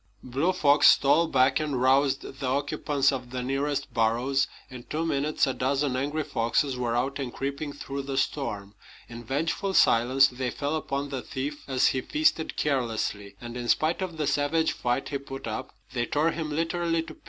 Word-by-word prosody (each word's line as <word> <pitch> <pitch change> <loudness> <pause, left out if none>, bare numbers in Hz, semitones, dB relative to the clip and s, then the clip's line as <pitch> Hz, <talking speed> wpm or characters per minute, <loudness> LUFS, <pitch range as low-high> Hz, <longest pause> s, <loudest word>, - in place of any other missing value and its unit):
Blue 135 +8 0
Fox 150 -5 +5
stole 150 +5 +4
back 130 -2 +3
and 150 -4 -2
roused 135 +2 +3 0.2
the 135 - -2
occupants 140 +1 +1
of 125 -2 -5
the 125 0 -4
nearest 140 0 -2
burrows. 120 +4 +1 0.2
In 130 -2 -9
two 155 +6 -3
minutes 150 -1 +1
a 135 - -1
dozen 135 +1 0
angry 145 +4 -1
foxes 125 +3 0
were 120 -2 -1
out 135 +4 -1
and 130 -3 -3
creeping 140 +3 -4
through 140 -1 -5
the 135 0 -4
storm. 105 -10 -2 0.3
In 120 0 -9
vengeful 160 - -1
silence 130 +4 +5
they 125 0 -3
fell 145 +4 -2
upon 140 -2 -3
the 135 -2 -4
thief 145 +4 -5
as 130 -2 +3
he 130 - -1
feasted 300 - 0
carelessly; 110 -7 -1
and 120 0 -8
in 120 -1 -4
spite 160 +8 +2
of 180 -4 -4
the 155 - -1
savage 145 +3 +1
fight 120 +2 -2
he 140 - -2
put 135 -1 -8
up, - - -5 0.2
they 120 -1 -1
tore 155 +6 +1
him 160 -2 -4
literally 165 +1 0
to - - -10
pieces. - - -22
140 Hz, 190 wpm, -27 LUFS, 125-150 Hz, 0.3 s, Fox